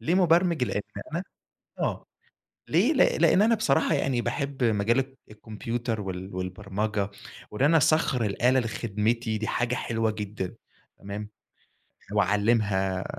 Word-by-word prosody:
ليه 160 +10 0
مُبرمِج؟ 170 -5 +3
لأن 105 -1 -2 0.3
أنا 170 - -1 0.6
آه، - - -2 0.6
ليه - - +3
ل - - -3 0.3
لإن 200 - +5
أنا 230 +1 +4
بصراحة 180 -11 +2
يعني، 125 -3 0
باحب 135 0 -2
مجال 110 +2 +2
الك 135 0 -3
الكمبيوتر 115 +1 -4
وال 95 -1 -6
والبرمَجة، 100 +2 -2 0.4
وإن 105 +5 -3
أنا 165 +3 +5
أسخَّر 150 -6 +3
الآلة 125 +6 +2
لخدمتي، 115 0 -1
دي 110 - -3
حاجة 120 0 0
حلوة 115 -2 -1
جدًا، 105 -3 -5 0.4
تمام، 100 +1 -6 0.8
وأعلّمها 100 -2 +1
110 Hz, 125 wpm, -27 LUFS, 105-130 Hz, 0.8 s, لإن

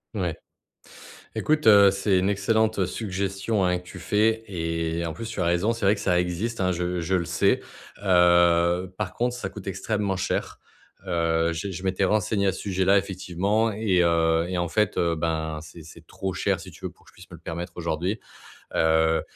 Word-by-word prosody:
Ouais. 90 -6 -2 1.0
Écoute, 155 0 0
heu, 100 -2 +8
c'est 95 0 +1
une 95 +1 +1
excellente 110 0 +1
suggestion, 95 +1 -2
hein, 90 0 +1
que 90 - -13
tu 95 - -10
fais 110 +4 +1
et 85 -2 -2
en 80 - -4
plus 115 +8 -6
tu 110 -2 -5
as - - +1
raison. 90 +6 +2
C'est 115 -3 -2
vrai 100 - +5
que 100 - -7
ça 90 -3 +2
existe, 90 +7 -3
hein, 95 0 +2
je 90 0 -2
je 85 +3 -1
le 90 -2 +1
sais, - - +2 0.4
heu, 85 0 +4
par 100 -4 -3
contre, 120 +1 0
ça 125 -6 -4
coûte 95 0 -11
extrêmement 100 0 -2
cher. 95 - -2 0.5
Heu, 85 -2 +1
j'ai 95 +4 -4
je 90 0 -7
m'étais 95 +1 +1
renseigné 100 0 +1
à - - +2
ce - - -7
sujet-là, 95 0 +2
effectivement 100 +3 -1
et 100 -4 +2
heu, 85 -1 +2
et 90 0 -3
en 85 0 -1
fait, 105 +5 0
heu, 85 -1 +2
ben, 80 -1 -2
c'est 80 +1 -12
c'est 80 0 -14
trop 95 +2 -5
cher, - - 0
si - - -10
tu - - -16
veux, - - -3
pour - - -25
que - - -17
je - - -30
puisse 90 - -15
me 85 - -9
le - - -20
permettre 85 +2 -6
aujourd'hui, 85 +5 -2 0.5
heu, 80 0 +3
90 Hz, 205 wpm, -25 LUFS, 85-100 Hz, 1.0 s, heu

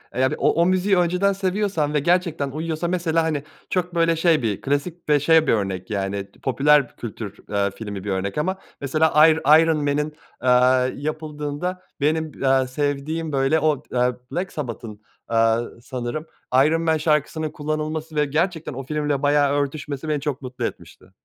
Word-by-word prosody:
Eee, 130 - 0
yani 130 - +2
o - - +3
o - - +4
müziği 185 +1 +2
önceden 180 +3 +2
seviyorsam 190 -5 -1
ve 150 - +3
gerçekten 165 -3 +1
uyuyorsa, 160 +3 -3
mesela, 165 -2 +1
hani, 155 -3 -1 0.3
çok 180 -1 -1
böyle 165 0 +3
şey 165 -2 +3
bir 110 -4 -2
klasik 150 +4 -2
ve 150 - +5
şey 160 +2 +4
bir - - +4
örnek, 95 -4 -2
yani, 100 -1 -3
t - - -24
popüler 140 0 +3
kültür, 105 -3 -7
eee, 100 -1 0
filmi 100 -4 -6
bir 100 - -3
örnek 95 +6 -2
ama 185 +5 0 0.2
mesela 155 +2 +4
Ir 160 0 +3 0.2
Iron 165 -1 +2
Man'in, 150 +1 -1 0.3
eee, 125 +1 +3
yapıldığında 155 +3 -4 0.2
benim, 155 +1 +1
aaa, 135 -1 +3
sevdiğim 145 +4 -2
böyle 135 +3 +2
o, 155 -3 +1
aaa, 125 0 +2 0.2
Black 180 +2 -3
Sabbath'ın, 115 -6 -6 0.3
aaa, 115 0 +3 0.2
sanırım 125 +5 -4 0.4
"Iron 165 +2 +2
Man" 160 -1 +2
şarkısının 155 0 0
kullanılması 155 +1 -4
ve 150 0 +3
gerçekten 160 +1 -1
o 135 +2 -6
filmle 150 0 -1
bayağı 145 -1 +3
örtüşmesi 145 +1 -4
beni 150 -2 0
çok 140 -3 -3
mutlu 130 -1 -4
etmişti. - - -8
150 Hz, 170 wpm, -22 LUFS, 130-160 Hz, 0.4 s, ve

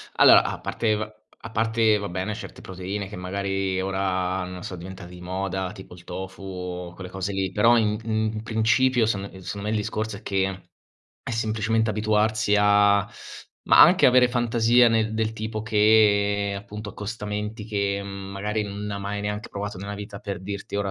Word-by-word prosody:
allora, - - +8
a - - -4
parte 110 -2 0
va 110 0 -5 0.3
a 115 - -6
parte 115 -1 +2
va 100 - -4
bene 95 +4 -3
certe - - -9
proteine 95 +2 -5
che 105 - -9
magari 95 0 -2
ora, 95 -1 -1
no, 90 0 -7
so 90 - -6
diventate 90 0 -9
di 90 0 -11
moda, 95 +1 -3
tipo 95 -3 -11
il 90 - -15
tofu 95 +2 -7
o 90 -2 -6
quelle 90 0 -9
cose 95 +1 -4
lì, 95 -1 -1
però 115 +5 +5
in 105 -2 +1
in 110 0 -3 0.2
in 110 0 -5
principio 115 +2 +2
secon 100 -3 -1
ehm, 95 -1 -11
secondo 100 +2 -6
me 110 - 0
il 110 - +1
discorso 110 0 -3
è - - -14
che 95 -1 -2 0.6
è - - -8
semplicemente 110 0 0
abituarsi 110 0 +1
a 100 0 +4 0.6
ma - - +6
anche - - +7
avere 125 0 +6
fantasia 120 0 +4
nel 110 -1 +1
del 110 0 0
tipo 110 -1 -4
che 105 -2 +3
appunto 105 +1 -8
accostamenti 105 0 -5
che, 100 -2 -1
mhmm, 100 0 -7
magari 105 +2 -2
non 100 0 -5
hai 100 -1 -4
mai 100 +1 -4
neanche 105 +1 -4
provato 100 -1 -5
nella 100 +2 -6
vita, 100 0 -7
per 100 -3 -5
dirti, 100 +1 -6
ora 100 -1 -1
105 Hz, 185 wpm, -25 LUFS, 95-110 Hz, 0.6 s, allora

